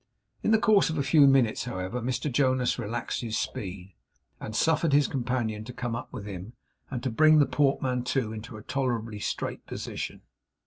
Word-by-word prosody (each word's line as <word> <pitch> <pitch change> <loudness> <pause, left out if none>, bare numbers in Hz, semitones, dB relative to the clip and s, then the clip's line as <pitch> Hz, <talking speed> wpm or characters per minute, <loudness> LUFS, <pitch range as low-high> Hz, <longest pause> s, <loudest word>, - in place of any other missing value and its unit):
In - - 0
the 220 - +6
course 215 -3 +4
of 160 - -2
a 140 - +1
few 140 +1 +6
minutes, 130 -5 +3
however, 120 0 -4
Mr 130 +4 -2
Jonas 130 -1 +2
relaxed 115 +1 -3
his 115 -2 -2
speed, 95 -1 -5 0.5
and 110 - -6
suffered 160 +1 +2
his 145 -1 +5
companion 120 -4 -2
to 125 - -8
come 120 -1 -3
up 120 - -6
with 110 -6 -7
him, 100 +2 -7 0.4
and 125 -3 -4
to 130 - -1
bring 155 +6 +6
the 145 - +6
portmanteau 130 -4 0
into 110 +1 -7
a 105 - -11
tolerably 120 -5 -2
straight - - -3
position. - - -5
125 Hz, 180 wpm, -28 LUFS, 110-140 Hz, 0.5 s, the